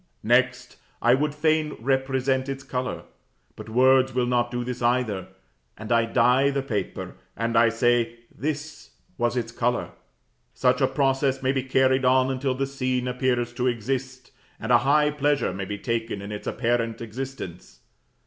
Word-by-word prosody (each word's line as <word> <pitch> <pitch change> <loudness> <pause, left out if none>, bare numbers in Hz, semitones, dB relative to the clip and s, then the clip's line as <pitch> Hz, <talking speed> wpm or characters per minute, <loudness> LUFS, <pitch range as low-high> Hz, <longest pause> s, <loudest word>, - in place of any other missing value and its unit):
Next: 120 +1 +1 0.2
I 120 - +4
would 145 +2 0
fain 155 0 +1
represent 130 +1 0
its 135 0 -5
color; 125 -1 -4 0.5
but - - -10
words 130 +2 +4
will 125 -1 +2
not 120 -1 +1
do 120 0 -3
this 125 0 -5
either, 120 -6 0 0.5
and 110 +2 -7
I 115 -1 +4
dye 125 +4 +3
the 140 -1 -1
paper, 110 -6 -4 0.2
and 115 0 -1 0.2
say, 120 0 +1 0.2
"This 150 +2 -5 0.3
was 120 +1 +1
its 115 -1 -2
color." 120 +1 -1 0.6
Such - - +2
a - - +4
process 135 -1 0
may 130 - +2
be 135 -1 0
carried 130 0 +2
on 130 +1 +3
until 130 0 -1
the 135 +1 -1
scene 130 -2 -2
appears 125 -1 0
to 125 +1 -1
exist, 130 +2 -3 0.3
and 110 - -3
a 120 - +7
high 150 +4 +3
pleasure 145 -7 0
may 95 +1 -4
be 100 +1 -5
taken 115 -1 -2
in 100 +1 -7
its 105 - -6
apparent 115 -1 -1
existence. 115 - -7
125 Hz, 160 wpm, -25 LUFS, 120-135 Hz, 0.6 s, a